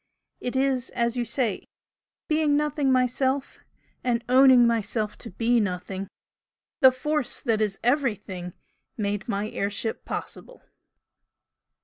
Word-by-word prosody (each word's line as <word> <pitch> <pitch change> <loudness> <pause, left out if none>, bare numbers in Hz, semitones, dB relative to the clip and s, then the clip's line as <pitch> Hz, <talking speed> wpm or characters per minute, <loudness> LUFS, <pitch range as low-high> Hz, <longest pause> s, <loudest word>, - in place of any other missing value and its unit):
"It 245 - -4
is 265 -2 +1
as 235 0 0
you 245 - 0
say, 235 -3 -1 0.6
being 305 -2 +2
Nothing 295 -2 +1
myself, 260 +2 0 0.4
and 235 -2 0
owning 255 -1 +7
myself 220 -2 0
to 230 - -8
be 230 +5 +1
Nothing; 190 -1 -3 0.7
the 260 - +8
Force 290 +1 -2
that 220 -2 0
is 205 -2 -1
Everything 210 - -1 0.4
made 205 +1 -2
my 205 0 -1
air 200 - -1
ship 215 +2 -3
possible!" - - -7
240 Hz, 120 wpm, -25 LUFS, 210-265 Hz, 0.7 s, the